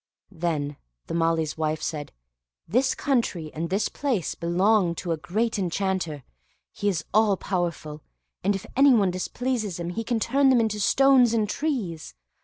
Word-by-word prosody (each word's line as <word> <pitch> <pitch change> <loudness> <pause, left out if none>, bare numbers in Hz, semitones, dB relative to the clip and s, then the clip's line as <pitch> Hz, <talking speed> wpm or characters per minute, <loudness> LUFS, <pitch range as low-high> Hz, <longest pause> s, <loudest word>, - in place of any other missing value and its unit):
Then 155 -4 -2 0.3
the - - -6
Malee's 165 -2 0
wife 155 0 0
said, 150 -2 -4 0.6
"This 260 +5 +2
country 215 - -1
and 165 +2 -3
this 200 +2 +1
palace 250 - -2
belong 180 +1 +2
to 170 +1 -4
a 165 - 0
great 215 +8 -1
enchanter; 180 -5 -2 0.5
he 205 - -1
is 170 -6 -2
all 210 -2 +4
powerful, 170 -6 -3 0.4
and 200 +2 +2
if 195 - -6
anyone 250 -9 +5
displeases 215 +1 -3
him, 170 0 -3
he 225 +5 -3
can 235 0 -1
turn 270 +5 +3
them 255 -2 +5
into 220 -2 0
stones 255 +2 +4
and 215 -2 +1
trees. 205 - -3
190 Hz, 155 wpm, -25 LUFS, 165-230 Hz, 0.6 s, anyone